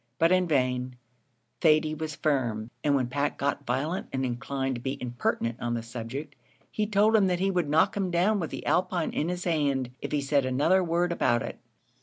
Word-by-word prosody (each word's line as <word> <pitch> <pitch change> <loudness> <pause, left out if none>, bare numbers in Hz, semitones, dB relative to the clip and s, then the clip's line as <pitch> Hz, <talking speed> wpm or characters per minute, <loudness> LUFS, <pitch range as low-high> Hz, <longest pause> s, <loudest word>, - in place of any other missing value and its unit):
But 165 +3 +3
in 185 -1 +3
vain 125 -4 0 0.6
Thady 155 -1 +4
was 155 -1 -4
firm; 120 -7 -1
and 145 -1 +3
when 130 -2 +2
Pat 140 +4 -1
got 140 0 -2
violent 145 +9 -1
and 130 0 -1
inclined 135 +2 -2
to 120 - -5
be 135 +2 -3
impertinent 120 -1 -2
on 120 0 -1
the 115 - -3
subject, 125 +5 -6 0.4
he 210 -1 -1
told 210 +1 +3
him 205 -3 +5
that 180 -1 0
he 195 +1 +1
would 175 -5 0
knock 155 +2 +3
him 195 -2 -1
down 185 +5 +2
with 165 - -3
the - - -7
alpine 175 -2 +1
in 160 - -1
his 180 0 -3
hand 140 -7 0
if - - -5
he 150 - +1
said 140 0 +2
another 145 +9 +2
word 175 +1 +1
about 120 -8 +1
it. - - -7
145 Hz, 205 wpm, -27 LUFS, 130-175 Hz, 0.6 s, him